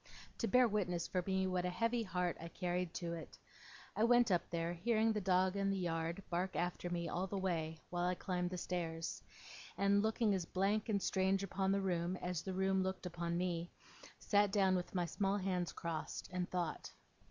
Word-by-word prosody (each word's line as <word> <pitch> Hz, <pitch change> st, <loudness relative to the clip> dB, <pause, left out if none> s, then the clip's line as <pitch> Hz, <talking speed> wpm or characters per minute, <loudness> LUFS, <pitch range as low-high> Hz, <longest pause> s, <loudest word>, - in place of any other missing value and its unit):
to 230 Hz, -, +1 dB
bear 250 Hz, 0 st, +6 dB
witness 180 Hz, -5 st, 0 dB
for 180 Hz, -1 st, -1 dB
me 190 Hz, 0 st, +2 dB
what 185 Hz, -1 st, 0 dB
a 180 Hz, -, 0 dB
heavy 230 Hz, +6 st, +1 dB
heart 180 Hz, -4 st, -1 dB
I 165 Hz, -, -5 dB
carried 180 Hz, 0 st, -2 dB
to 170 Hz, -1 st, -3 dB
it. 165 Hz, -, -8 dB, 0.6 s
I 215 Hz, -, +2 dB
went 240 Hz, -1 st, +5 dB
up 175 Hz, -2 st, +1 dB
there, 170 Hz, 0 st, -1 dB
hearing 220 Hz, +5 st, +2 dB
the 210 Hz, -, -1 dB
dog 185 Hz, 0 st, +3 dB
in 195 Hz, 0 st, +1 dB
the 195 Hz, -, +1 dB
yard 170 Hz, +1 st, -2 dB
bark 180 Hz, +2 st, -1 dB
after 175 Hz, 0 st, -1 dB
me 170 Hz, -1 st, -2 dB
all 180 Hz, +3 st, -1 dB
the 200 Hz, -, -3 dB
way 165 Hz, -4 st, -1 dB
while 175 Hz, 0 st, 0 dB
I 180 Hz, -, +1 dB
climbed 180 Hz, -1 st, -1 dB
the 180 Hz, -, -4 dB
stairs; 165 Hz, -2 st, -3 dB, 0.6 s
and, 200 Hz, 0 st, +4 dB
looking 220 Hz, 0 st, +2 dB
as 190 Hz, -2 st, 0 dB
blank 200 Hz, +5 st, 0 dB
and 205 Hz, -2 st, +2 dB
strange 190 Hz, +1 st, +2 dB
upon 195 Hz, 0 st, 0 dB
the 200 Hz, 0 st, +2 dB
room 180 Hz, -1 st, 0 dB
as 180 Hz, -3 st, -2 dB
the 190 Hz, +1 st, -4 dB
room 190 Hz, 0 st, +2 dB
looked 190 Hz, 0 st, -2 dB
upon 170 Hz, -1 st, -2 dB
me, 175 Hz, -1 st, -1 dB, 0.5 s
sat 205 Hz, -1 st, +3 dB
down 195 Hz, -2 st, +4 dB
with 180 Hz, +1 st, -3 dB
my 175 Hz, -1 st, +2 dB
small 195 Hz, +4 st, 0 dB
hands 185 Hz, -3 st, -1 dB
crossed, 165 Hz, -2 st, -4 dB
and 180 Hz, -1 st, -2 dB
thought. 175 Hz, -3 st, -2 dB
185 Hz, 200 wpm, -37 LUFS, 175-195 Hz, 0.6 s, bear